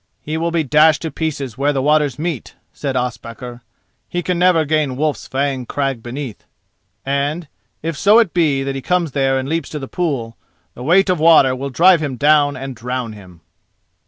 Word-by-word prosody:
"He 155 - -4
will 165 +1 -1
be 165 -1 0
dashed 150 +2 +4
to 160 - -3
pieces 140 -6 -4
where 145 +1 +2
the 135 - -1
waters 150 -3 +2
meet," 155 -5 -4 0.2
said 140 -2 -4
Ospakar, 120 0 -5 0.5
"he 175 0 -2
can 180 0 -1
never 180 -3 +4
gain 150 -3 0
Wolf's 150 +2 -2
Fang 135 -2 -2
crag 135 -4 -2
beneath; 125 -1 -7 0.6
and, 140 +4 -1 0.4
if 165 0 -2
so 205 +9 +5
it 225 -7 +3
be 150 -6 +2
that 135 0 -3
he 135 - -5
come 180 +4 +1
there 135 -3 0
and 130 0 -3
leaps 165 +3 -2
to 155 - -5
the 135 -2 -6
pool, 130 -11 -3 0.4
the - - -11
weight 185 +8 +3
of 180 - 0
water 155 -5 +5
will 135 +2 -4
drive 170 +5 +5
him 145 -4 -3
down 145 +2 +3
and 135 0 -6
drown 125 -1 -4
him." 90 -5 -14
145 Hz, 190 wpm, -18 LUFS, 130-160 Hz, 0.6 s, so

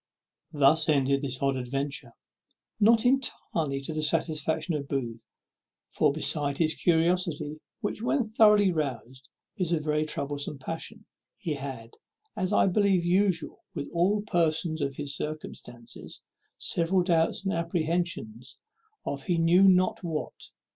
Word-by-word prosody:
Thus 150 +2 +4
ended 140 -2 +2
this 130 -3 -3
odd 135 -1 +2
adventure, 135 +3 -3 0.7
not 225 +2 +5
entirely 165 - 0
to 145 +3 -5
the 155 - -2
satisfaction 160 +1 +1
of 140 -2 -3
Booth; 120 -5 -4 0.6
for, - - +2
besides 145 -1 -1
his 160 -1 +2
curiosity, 165 -3 0 0.2
which, 210 -1 -3
when 250 +3 +1
thoroughly 210 -3 +5
roused, 130 -4 -4 0.3
is 180 -3 -1
a 165 - +2
very 150 0 0
troublesome 145 0 -3
passion, 165 +10 -6 0.3
he 165 -5 -3
had, 135 -5 -7 0.4
as 185 - -1
is - - -2
I - - +4
believe 195 -2 +2
usual 180 -2 +1
with 145 -3 -5
all 195 +5 +2
persons 165 -4 0
in 140 -1 0
his 140 0 -2
circumstances, 130 -5 -7 0.3
several 175 +2 +1
doubts 170 +2 +1
and 195 - 0
apprehensions 165 -8 -2 0.5
of 140 -1 -4
he 175 - +1
knew 165 +3 +4
not 185 0 +3
what. 160 -3 -5
160 Hz, 135 wpm, -28 LUFS, 140-180 Hz, 0.7 s, not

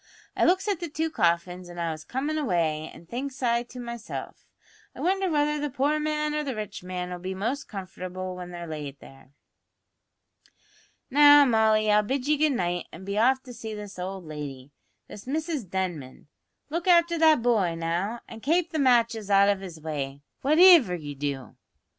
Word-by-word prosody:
I - - +2
looks 375 +4 +2
at 400 -5 0
the 345 - -5
two 320 +2 -2
coffins 175 - 0
as 175 - -10
I 170 -1 -1
was 155 -1 -7
comin' 285 +4 -3
away, 165 - 0
an' 170 - -14
thinks 260 +7 -6
I 235 -1 +2
to 245 +1 -10
myself, 235 -2 -7 0.5
I - - -11
wonder 380 +1 +1
whether 300 -1 +1
the 295 0 -2
poor 285 +3 0
man 300 0 -1
or 300 0 -1
the 270 -4 -4
rich 215 -2 -6
man'll 180 -1 -5
be 185 +1 -5
most 235 +9 -3
comfortable 185 -1 -6
when 180 -1 -8
they're 175 -1 -7
laid 150 -3 -7
there?" 135 -1 -16 1.8
"Now, 290 +1 +8
Molly, 220 -3 +3
I'll 210 0 +5
bid 260 +5 -2
ye 300 - +4
good 300 0 +2
night 175 -6 -2
an' 185 +4 -10
be 200 +1 -1
off 260 +3 +3
to 250 - -10
see 220 -2 -7
this 205 -2 -9
owld 185 0 -5
lady, 145 -3 -7 0.4
this 205 - -11
Mrs 300 - -3
Denman. 175 -9 -4 0.4
Look 335 +3 -3
afther 340 -1 +4
that 315 -6 +5
boy, 205 -9 +2
now, 175 +8 -2
an 225 - -10
kape 335 +7 +1
the 315 - -2
matches 235 -5 +2
out 200 0 +5
of 200 -1 +1
his 175 -4 -9
way, 145 -3 -5 0.2
whativer 310 - +7
ye 145 -2 -7
do." 140 -2 -5
215 Hz, 185 wpm, -26 LUFS, 175-290 Hz, 1.8 s, Now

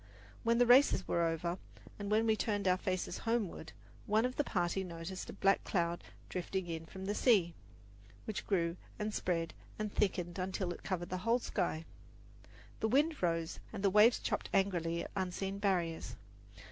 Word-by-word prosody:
When 230 0 +3
the 245 - +5
races 245 -5 +6
were 170 - +1
over, 170 +2 -1 0.4
and 205 0 -4
we 220 +1 +3
turned 205 -2 -1
our 180 - +5
faces 185 -1 -2
homeward, 225 -8 -2 0.4
one 215 +3 +3
of 255 0 -2
the 295 - +1
party 185 -4 0
noticed 175 +1 -6
a - - -6
black 195 -1 +3
cloud 170 -2 0 0.2
drifting 185 +1 -3
in 165 -1 -5
from 190 +2 -8
the 205 - 0
sea, 200 -8 +4 0.7
which 215 - -4
grew 170 -3 +1 0.2
and 210 0 -2
spread 165 -4 -1 0.2
and 210 -1 -3
thickened 180 -3 0
until 185 -1 -2
it - - -12
covered 175 -3 -3
the 185 - -2
whole 230 +5 +3
sky. 175 -8 -2 0.9
The 220 - +1
wind 295 +7 +2
rose, 165 -2 0
and 205 -2 -6
the 195 - +4
waves 215 +4 +7
chopped - - -2
angrily 170 -4 +1
at - - -8
unseen 190 +1 -2
barriers. 170 - 0
190 Hz, 170 wpm, -34 LUFS, 175-210 Hz, 0.9 s, waves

